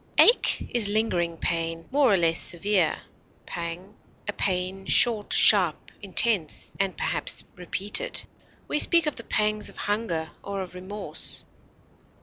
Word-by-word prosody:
Ache 475 - +5
is 235 -4 +1
lingering 180 -6 -1
pain, 165 0 -4
more 275 -3 +2
or 195 - +3
less 165 -1 +1
severe; 180 -2 +1 0.4
pang, 175 +4 -7 0.3
a 205 - -3
pain 190 0 -3
short, 220 -4 +2
sharp, 185 -7 +4
intense, 200 -4 +3
and 195 -1 -2
perhaps - - -2
repeated. 195 - -3 0.4
We 300 - 0
speak 335 0 +6
of 300 - -3
the 230 - -7
pangs 215 -1 -1
of - - -16
hunger 180 -7 -3
or 200 -1 -5
of 180 - -12
remorse. 190 +3 -2
195 Hz, 135 wpm, -24 LUFS, 175-215 Hz, 0.4 s, speak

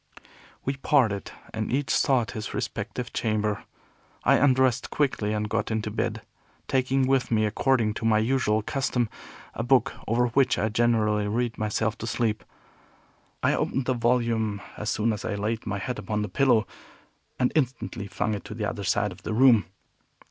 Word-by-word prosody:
We 135 +1 -1
parted, 120 -9 +2 0.2
and 110 -1 -3
each 135 +2 0
sought 125 -5 +2
his 110 -1 -5
respective 120 +3 -4
chamber. 105 -2 -1 0.6
I - - +5
undressed 130 -2 +3
quickly 130 -8 0
and 105 0 -1
got - - -1
into 110 -1 -2
bed, - - -2 0.4
taking 130 0 +2
with 135 -1 +2
me, 110 -2 +2
according 110 0 +1
to 110 - -5
my 110 -1 +4
usual 110 -2 +1
custom, 125 -2 -1 0.4
a - - -3
book, 125 +2 +3
over 120 +2 +2
which 130 +1 +3
I 110 - +1
generally 105 -2 +2
read 115 +2 -1
myself 110 +1 -1
to 115 - -4
sleep. 110 -4 -1 1.0
I - - +3
opened 135 - -1
the 130 - +1
volume 115 -3 +1 0.2
as 105 - -3
soon 110 +1 +1
as 105 - -6
I - - -3
had - - -5
laid 110 +2 -2
my 100 -1 -1
head 125 +6 -4
upon 105 -1 -2
the 105 - -4
pillow, 120 +2 +3 0.7
and 125 - +2
instantly 125 -7 -1
flung 110 +2 -1
it 100 - -4
to 105 - -7
the 105 -2 -2
other 100 -1 -4
side - - +1
of - - -12
the - - -4
room. 120 -6 +5
115 Hz, 175 wpm, -26 LUFS, 105-125 Hz, 1.0 s, I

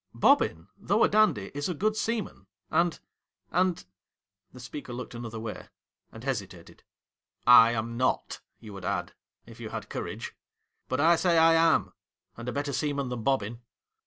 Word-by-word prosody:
Bobbin, 80 +2 +3
though 205 +5 +2
a - - +6
dandy, 210 - +2
is 145 +4 -3
a 180 - -2
good 215 +7 0
seaman, 220 - -3 0.2
and 170 -1 +1 0.3
— - - -47
and 180 - +1 0.3
.' 95 0 -56
The 125 - -13
speaker 125 +1 -8
looked 125 +1 -7
another 115 -1 -6
way, 110 -1 -7 0.4
and 115 - -11
hesitated. 100 -10 -5 0.4
' - - -47 0.2
I 115 - 0
am 115 +1 -3
not, 130 +1 -1 0.2
you 105 -2 -11
would 95 -2 -9
add - - -2 0.2
— - - -51
if - - -14
you - - -6
had - - -6
courage. - - -5 0.5
But 130 +2 0
I 165 +2 +5
say 175 -1 +2
I 165 0 +6
am, 165 0 +3 0.4
and 120 +1 -6
a - - -2
better 140 +2 -3
sea 150 0 -1
man 140 -2 -3
than 125 -2 -4
Bobbin.' 115 -2 -1
130 Hz, 185 wpm, -28 LUFS, 110-165 Hz, 0.5 s, a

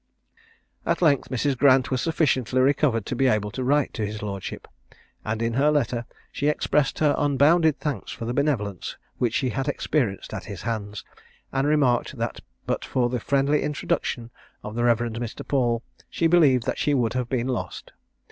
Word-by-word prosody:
At - - 0
length 145 -5 +3
Mrs. 135 +2 0
Grant 130 0 +4
was 130 -2 0
sufficiently 130 -5 +1
recovered 130 -4 +2
to - - -3
be 135 +2 +2
able 105 -3 +1
to 130 - -4
write 145 +2 +2
to 110 - -3
his 105 0 -4
lordship, 100 -2 -5 0.6
and 110 +1 -2
in 115 0 0
her 140 +5 +3
letter 120 -5 0 0.2
she 145 - -1
expressed 150 -1 +1
her 150 -2 +3
unbounded 145 +2 +3
thanks 145 -9 -3
for 115 - -6
the 120 - -2
benevolence 120 - -1 0.2
which 120 -3 +1
she 130 - +1
had 135 +2 -2
experienced 135 -8 -1
at - - -5
his - - -8
hands, 105 -3 -4 0.5
and 135 +1 +1
remarked 140 -5 +2
that - - -3 0.3
but - - -1
for 125 -2 0
the 125 0 -2
friendly 140 +4 +1
introduction 120 -5 -2 0.3
of 105 - -6
the 120 +1 -1
Rev. 120 -1 +4
Mr. 115 -1 -5
Paul, 120 -4 +1 0.3
she 165 - -1
believed 150 -8 +4
that - - -2
she 145 - +2
would 120 -4 +1
have 125 -2 -2
been 125 -1 -1
lost. 125 - -4
130 Hz, 180 wpm, -25 LUFS, 115-145 Hz, 0.6 s, Grant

